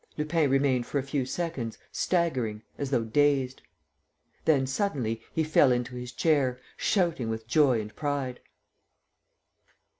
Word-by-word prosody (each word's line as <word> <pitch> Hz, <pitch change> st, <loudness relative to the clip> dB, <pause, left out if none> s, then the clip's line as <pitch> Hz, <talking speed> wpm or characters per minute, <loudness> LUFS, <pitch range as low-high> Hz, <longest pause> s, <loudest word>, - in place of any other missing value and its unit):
Lupin 155 Hz, -1 st, +1 dB
remained 135 Hz, -2 st, +2 dB
for -, -, -2 dB
a 135 Hz, -, 0 dB
few 135 Hz, -1 st, -2 dB
seconds, 135 Hz, -8 st, -3 dB
staggering, 130 Hz, -12 st, 0 dB
as 140 Hz, -2 st, -3 dB
though 125 Hz, -4 st, +1 dB
dazed.... 135 Hz, +2 st, +1 dB, 0.8 s
Then, 140 Hz, -4 st, +4 dB
suddenly, 130 Hz, -, -1 dB
he 160 Hz, -, 0 dB
fell 150 Hz, -3 st, +4 dB
into 125 Hz, 0 st, -1 dB
his 125 Hz, 0 st, -6 dB
chair, 135 Hz, -5 st, +1 dB, 0.2 s
shouting 170 Hz, -, +1 dB
with 110 Hz, 0 st, -4 dB
joy 130 Hz, -2 st, +4 dB
and 105 Hz, 0 st, -7 dB
pride. 140 Hz, -4 st, -2 dB
135 Hz, 130 wpm, -28 LUFS, 125-150 Hz, 0.8 s, Then